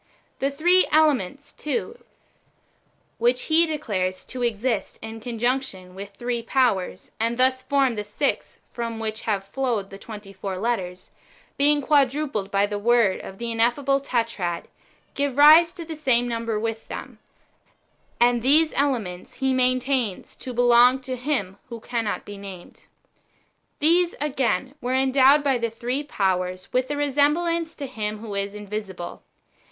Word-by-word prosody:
The 275 - +1
three 350 +6 +3
elements, 290 -4 +1
too 455 +9 -4 1.2
(which 245 +2 +2
he 330 +1 +3
declares 195 -12 -2
to 255 - -6
exist 230 -2 -1
in 225 0 -7
conjunction 235 -5 -2
with 200 +1 -9
three 240 -1 -3
powers,^ 230 -6 0
and 230 +1 0
thus 260 0 +3
form 275 -3 +2
the 210 -2 -4
six 210 +7 -2 0.2
from 230 -1 -4
which 220 0 -4
have 200 -2 0
flowed 215 -1 -2
the 195 - -9
twenty 205 -3 -10
four 195 -1 -5
letters), 185 -4 -3 0.4
being 290 +1 +3
quadrupled 275 -7 +1
by 200 0 +2
the 205 0 -4
word 230 -3 +3
of 190 - -9
the 235 +1 -4
ineffable 245 +5 +2
Tetrad, 230 -10 -2 0.5
give 280 -2 -2
rise 315 +3 +8
to 335 - -8
the 320 0 -6
same 255 -5 +1
number 230 -2 -2
with 225 0 -4
them; - - -8 1.0
and 240 0 +4
these 305 +6 +4
elements 225 -11 -2
he 265 0 0
maintains 255 -4 0
to 255 - -7
belong 245 +1 +5
to 255 0 -4
Him 240 -8 -2
who 235 -1 -7
can 235 0 -3
not 205 - -3
be 205 -1 -9
named. 190 -3 -11 0.9
These, 340 +3 +3
again, 270 -2 -1
were 250 +1 -1
endowed 265 +2 +5
by 270 -3 +1
the 230 0 -1
three 245 +5 -3
powers 185 -8 -2
with 255 +1 +1
a 290 - -2
resemblance 315 +4 +1
to 285 - -5
Him 215 -5 -4
who 215 -1 -8
is 200 +1 -3
invisible. 205 -4 -6
240 Hz, 150 wpm, -24 LUFS, 210-275 Hz, 1.2 s, rise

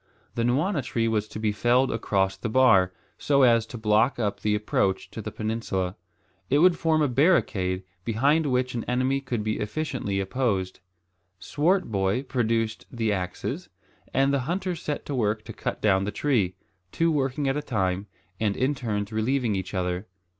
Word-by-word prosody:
The 115 - -2
nwana 145 - +1
tree 115 -3 -1
was 110 -2 0
to - - -8
be 110 -1 0
felled 120 +5 +2
across 95 -4 0
the 95 +4 -4
bar, 110 -7 +5 0.3
so 140 -2 +3
as 115 -2 +4
to 120 - -7
block 110 +3 +2
up 100 -3 -1
the 105 0 +1
approach 100 -2 0
to - - -6
the - - -6
peninsula. 105 -4 -2 0.5
It 140 - +3
would 175 +3 +5
form 160 -2 +2
a - - +3
barricade 115 - +2 0.2
behind 140 - +2
which 125 -1 0
an 115 -2 -3
enemy 130 +2 0
could 120 -5 -3
be 110 0 -1
efficiently 110 -4 -2
opposed. 95 -3 -1 0.6
Swartboy 125 - 0
produced 115 -6 -1
the 110 -3 0
axes, 90 -2 -4 0.4
and 135 +1 +2
the 140 - +2
hunters 180 -1 -2
set 150 - -4
to 145 - -4
work 110 -3 0
to - - -7
cut - - -4
down 95 -2 +3
the 105 - -2
tree, 105 -7 0 0.4
two 165 0 +2
working 140 -1 0
at 135 - +1
a 150 - -1
time, 95 -6 -1 0.3
and 105 -2 0
in 130 +3 +1
turns 110 -5 -3
relieving 115 0 0
each 95 +1 -4
other. 90 +2 -2
115 Hz, 175 wpm, -26 LUFS, 100-135 Hz, 0.6 s, bar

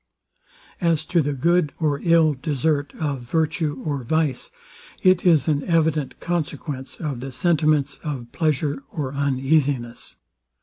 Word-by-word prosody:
As 165 -3 +1
to 170 +1 +2
the 145 0 -1
good 165 +2 +2
or 150 -3 +1
ill 165 -3 +4
desert 145 +1 -1
of 145 -5 -2
virtue 150 +2 -1
or 145 -3 -1
vice, 155 0 0 0.5
it 185 -1 +4
is 155 -7 +4
an 145 -2 +1
evident 160 -4 +1
consequence 150 -5 -4
of 145 -6 -3
the 135 +2 -6
sentiments 150 0 +1
of 130 -7 -5
pleasure 145 -2 0
or 140 -5 -4
uneasiness. 135 -3 0
150 Hz, 130 wpm, -23 LUFS, 135-160 Hz, 0.5 s, ill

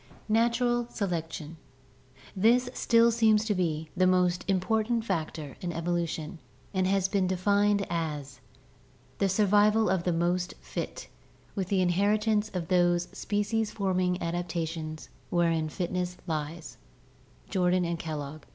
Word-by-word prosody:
' - - -28
Natural 240 0 +1
Selection 165 -5 -4 0.8
This 240 +5 +3
still 230 -1 +4
seems 220 -2 +3
to 215 - +1
be 160 -4 -2
the 185 0 +3
most 180 -1 +2
important 220 +4 +1
factor 155 - -3
in 175 - -3
evolution 170 0 -2 0.3
and 185 -1 +1
has 195 -1 +2
been 190 -1 +1
defined 200 +2 +2
as 150 -6 -4 0.8
"The 195 - +2
survival 210 +2 +4
of 190 -2 +1
the 180 - +1
most 175 +2 0
fit - - -6 0.5
with 190 -3 -2
the 190 -1 +1
in 180 - +2
heritance 210 +3 +2
of 170 -3 -2
those 175 -1 +2
species 210 +1 -1
forming 185 -3 0
adaptations 165 -2 -3 0.2
wherein 165 -2 +1
fitness 180 +1 -3
lies" 160 0 -4 0.7
(Jordan 180 -1 +2
and 170 0 -2
Kellogg). 155 -2 -6
180 Hz, 130 wpm, -28 LUFS, 170-205 Hz, 0.8 s, still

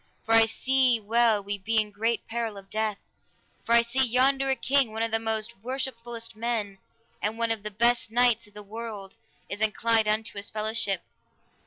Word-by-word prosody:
for 225 - +1
I 225 0 +7
see 260 0 +2
well 220 -1 +2
we 200 0 -4
be 220 +3 +1
in 210 -1 -1
great 225 +2 -2
peril 225 -2 -3
of 195 0 -13
death; 215 -1 -1 0.7
for 230 - 0
I 235 - +6
see 255 +3 +1
yonder 265 +2 +2
a 265 - +3
king, 270 -3 +1
one 220 +1 -2
of 230 - -1
the 225 - +2
most 220 0 -1
worshipfullest 235 -2 -5
men 215 -4 -3 0.4
and 215 +2 -2
one 230 0 +1
of 225 -2 -1
the 210 - -4
best 235 +3 +2
knights 235 -1 +2
of 205 - -23
the 210 - -9
world, 210 -2 -7 0.3
is 205 +1 -6
inclined 220 0 +2
unto 215 0 -1
his 200 - -5
fellowship. 215 -3 0
225 Hz, 190 wpm, -26 LUFS, 210-235 Hz, 0.7 s, I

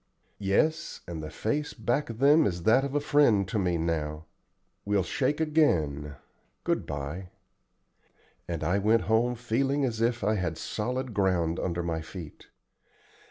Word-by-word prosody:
"Yes, 155 +12 0
and 85 -2 -5
the 75 - -6
face 150 - -2
back 120 +5 -1
of 115 - -6
them 145 +3 +5
is 85 -3 -3
that 120 +8 +5
of 140 0 -3
a - - +4
friend 140 -9 +3
to 105 - -1
me 90 -3 +1
now. 80 -2 -2 0.6
We'll 100 -1 +1
shake 140 - 0
again. 80 - +1 0.5
Good - - -1
by;" 70 +6 -5 1.2
and 85 -3 -3
I 90 +6 +1
went 110 +3 +3
home 115 +3 +2
feeling 135 +4 0
as 115 -3 -2
if 120 -1 +1
I 105 +2 +2
had 90 -6 -2
solid 125 +6 -3
ground 90 -4 +1
under 85 -1 -2
my 80 -1 -2
feet. 80 -1 -10
105 Hz, 155 wpm, -28 LUFS, 85-130 Hz, 1.2 s, them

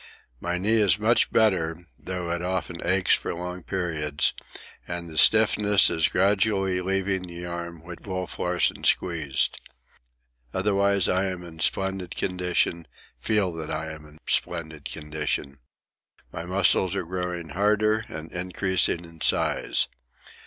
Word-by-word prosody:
My 85 +5 -2
knee 110 +5 +2
is 100 -2 +4
much 110 +3 +2
better, 90 -6 +2
though 90 -2 -4
it 85 0 -2
often 90 -1 -3
aches 95 +1 +3
for - - 0
long 90 +1 -5
periods, 80 -6 -1 0.5
and 85 -1 -4
the 80 - -9
stiffness 105 +1 +5
is 80 - +2
gradually 95 -1 +2
leaving 95 0 -1
the 85 0 -7
arm 85 -1 -6
which 85 0 -9
Wolf 95 -1 -4
Larsen 90 -2 0
squeezed. 80 -6 +1 0.9
Otherwise 100 0 +2
I 95 +1 +2
am 90 -2 -4
in 80 -2 -11
splendid 95 +1 -1
condition, 90 -2 0 0.3
feel 105 -5 +1
that 80 -2 -5
I 80 0 -3
am 80 -1 -10
in 75 +1 -17
splendid 80 -3 -1
condition. 75 -2 -3 0.7
My 80 - -6
muscles 95 0 +3
are - - -2
growing 90 -1 -4
harder 105 +4 +2
and 80 +1 -8
increasing 90 -1 0
in 85 -1 -15
size. - - +2
90 Hz, 135 wpm, -26 LUFS, 85-95 Hz, 0.9 s, stiffness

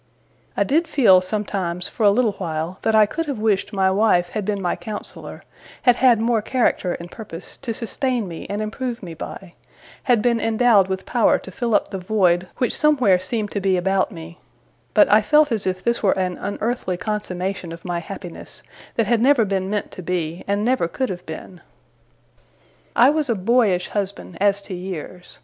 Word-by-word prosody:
I - - +4
did 325 +5 +1
feel, 190 -10 +5
sometimes, 185 -3 -3
for - - -9
a 210 - +6
little 220 +2 +2
while, 170 -2 -4
that 220 - +1
I 215 -1 +7
could 330 +9 -4
have 280 -4 -3
wished 210 -2 0
my 190 -2 +2
wife 190 -3 +3
had 210 +1 -4
been 205 -1 -1
my 180 -2 -1
counsellor; 210 -1 -7 0.4
had 245 -2 +5
had 250 -3 +5
more 230 -1 +1
character 220 -6 0
and 170 +1 -9
purpose, 185 -6 -9
to 255 -4 -5
sustain 240 0 -2
me 165 -2 -8
and 205 +2 -2
improve 235 +1 -4
me 170 -3 -7
by; 175 +2 -8 0.5
had 240 -5 +3
been 235 -1 +2
endowed 225 -3 +3
with 190 0 -4
power 240 -3 +3
to 190 - -11
fill 230 +3 -1
up - - +1
the 195 - -4
void 180 -2 +2
which 250 - 0
somewhere 255 -12 +3
seemed 205 +3 -3
to 205 - -2
be 190 -1 +2
about 190 +3 +1
me; 165 -1 -10 0.6
but - - +7
I - - +5
felt 300 -2 +4
as 215 -4 -1
if 185 0 -2
this 235 0 0
were 195 -2 +2
an 185 -1 -1
unearthly 205 -2 -2
consummation 185 -2 -3
of 165 +1 -10
my 175 -1 -2
happiness, 180 0 -9 0.3
that 230 0 +2
never 255 0 +4
had 205 - -4
been 190 -1 -1
meant 205 0 -2
to - - -8
be, 170 -2 -3
and 200 +1 0
never 250 -8 +2
could 260 +9 -2
have 180 -1 -7
been. 170 +3 -9 1.3
I 250 +4 +6
was 305 -3 -1
a 235 - +2
boyish 200 -3 +2
husband 200 -3 -4
as 200 0 +2
to 195 - -7
years. 180 -1 -7
200 Hz, 195 wpm, -21 LUFS, 180-230 Hz, 1.3 s, I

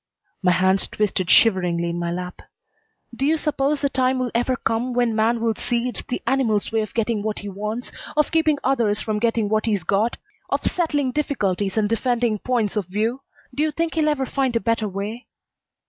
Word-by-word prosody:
My 180 -1 +4
hands 190 +2 +2
twisted 190 -4 -1
shiveringly 175 -5 +4
in 170 - -3
my 170 0 -2
lap. 180 +1 -5 0.7
"Do 265 - -3
you 310 +3 +3
suppose 290 -1 0
the 280 - +2
time 260 -1 +1
will 255 -2 -1
ever 245 +2 +1
come 235 +1 -1
when 240 -2 +1
man 230 +2 +2
will 225 0 +1
see 240 +2 -1
it's - - -6
the 245 - -5
animal's 235 -5 +1
way 225 0 +1
of 215 - -6
getting 230 -2 0
what 215 0 -2
he 205 - -6
wants, 210 +5 -5 0.3
of 300 - +3
keeping 320 -2 +3
others 230 -6 +1
from 215 -1 -2
getting 230 -1 +1
what 215 +2 0
he's 205 -5 +1
got, 205 +7 +1 0.3
of - - -1
settling 295 -6 +1
difficulties 205 -10 -1
and 215 -1 +3
defending 230 -1 0
points 230 -4 0
of 205 -5 -1
view? 220 +7 -1 0.3
Do 280 - -2
you 310 - +2
think 330 +2 -2
he'll 310 -2 +2
ever 280 -3 0
find 260 -2 -1
a - - +4
better 230 +1 0
way?" 205 +5 -5
230 Hz, 200 wpm, -22 LUFS, 205-260 Hz, 0.7 s, My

